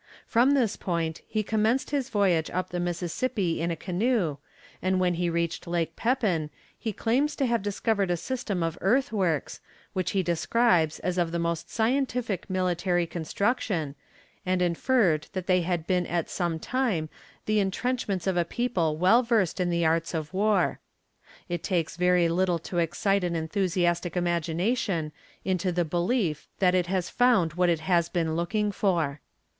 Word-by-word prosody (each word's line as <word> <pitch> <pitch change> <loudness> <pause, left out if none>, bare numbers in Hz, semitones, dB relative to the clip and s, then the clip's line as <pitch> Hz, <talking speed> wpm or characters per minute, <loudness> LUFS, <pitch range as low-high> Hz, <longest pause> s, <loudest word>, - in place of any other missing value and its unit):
From 255 +5 +4
this 240 -7 +1
point 165 -3 -2
he 215 -1 -1
commenced 220 +6 +1
his 275 -3 -1
voyage 185 -6 +2
up 185 0 -3
the 175 - -2
Mississippi 175 +2 -1
in 170 - 0
a 170 - -1
canoe, 185 - 0 0.4
and 185 0 +1
when 180 -1 +2
he 175 0 0
reached 170 0 -2
Lake 170 -1 -1
Pepin 215 - 0 0.3
he 225 - -4
claims 255 +9 0
to 275 - 0
have 235 -3 +1
discovered 205 0 0
a 175 - +1
system 205 -4 -3
of 165 +1 -3
earthworks, 195 - +1 0.3
which 185 -2 -1
he 195 -1 +2
describes 170 0 +2
as 180 0 -1
of 170 -2 +1
the 170 - -1
most 170 -1 -2
scientific 235 -4 -1
military 180 -1 +1
construction, 170 - -1 0.5
and 185 0 0
inferred 175 - +2
that 185 -2 -3
they 185 -1 +3
had 170 -2 -1
been 180 -1 +1
at 170 -1 -2
some 170 -3 -1
time 215 -5 -1 0.4
the 215 0 +2
intrenchments 200 -1 -1
of 190 -2 +1
a 175 - +3
people 170 -6 -1
well 190 +8 +5
versed 225 -8 +1
in 180 -1 +1
the 170 -1 +1
arts 165 +1 +1
of 155 +1 -4
war. 200 -1 +2 0.7
It 175 -3 -3
takes 170 -4 -1
very 180 0 +3
little 175 +1 +1
to 175 +2 -4
excite 190 +4 +1
an 175 -1 -1
enthusiastic 175 +1 0
imagination 175 +1 0 0.3
into 185 -1 0
the 175 0 0
belief 175 - -1
that 180 -2 +3
it 180 -1 +2
has 185 -1 -1
found 225 -11 +3
what 180 +1 +2
it 165 -2 +1
has 170 0 +2
been 165 -3 -1
looking 205 +5 0
for. 165 -9 0
180 Hz, 165 wpm, -27 LUFS, 170-210 Hz, 0.7 s, well